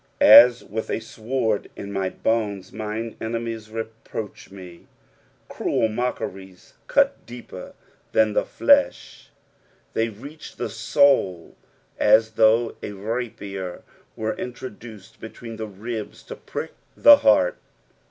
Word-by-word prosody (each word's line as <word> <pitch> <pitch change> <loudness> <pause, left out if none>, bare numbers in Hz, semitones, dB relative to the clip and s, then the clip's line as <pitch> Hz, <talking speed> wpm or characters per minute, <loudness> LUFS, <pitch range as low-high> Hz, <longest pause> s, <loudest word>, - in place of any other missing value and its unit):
"At 120 0 +8
with 110 +2 -5
a - - -1
tword 110 -1 -2
in 100 0 -7
my 95 -1 -1
honet, 100 -3 -2
mine 110 +1 -5
enemiei 115 0 -3 0.4
Teproach 105 -3 -7
tn«." 90 -3 -12 0.6
Cruel 110 - -1
mockeries 95 -5 -5
cut - - +2
deeper 120 0 -10 0.4
than 110 -1 +3
the - - +2
fiesh, - - +1 0.7
they 115 +1 0
reach 140 +9 -11
the - - -4
soul 110 - +2 0.4
as 110 +1 +4
though 110 +1 +3
a 105 - -6
rapier 100 -3 -5 0.3
were 110 0 -2
introduced 115 -3 -9
between 115 0 -9
the 110 0 -5
ribs 105 +2 -7
to - - -9
prick - - -6 0.3
the 290 0 +9
heart. - - +3
110 Hz, 115 wpm, -23 LUFS, 100-115 Hz, 0.7 s, the